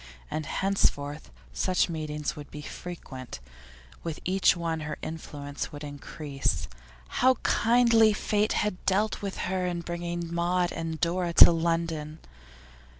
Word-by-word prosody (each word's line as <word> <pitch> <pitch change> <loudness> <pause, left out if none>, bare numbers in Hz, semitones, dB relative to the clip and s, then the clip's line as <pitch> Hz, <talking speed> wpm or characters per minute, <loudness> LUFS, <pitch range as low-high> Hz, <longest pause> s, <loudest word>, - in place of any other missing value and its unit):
And 155 -1 -3
henceforth 150 -7 0 0.2
such 180 - +2
meetings 155 -3 -3
would 145 -1 -9
be 150 - -8
frequent, 130 - -8 0.6
with 165 -2 -4
each 190 0 +3
one 165 -1 -2
her 150 0 -4
influence 145 -3 -5
would 145 0 -8
increase. 145 - -3 0.4
How 260 +1 +3
kindly 230 -2 +5
fate 210 0 +1
had 210 -3 -1
dealt 205 +3 +1
with 200 -1 -4
her 185 0 -1
in 175 -1 -2
bringing 170 0 -4
Maud 175 +1 +1
and 165 -1 -4
Dora 175 0 0
to - - +10
London! 165 -2 -1
170 Hz, 130 wpm, -28 LUFS, 150-185 Hz, 0.6 s, to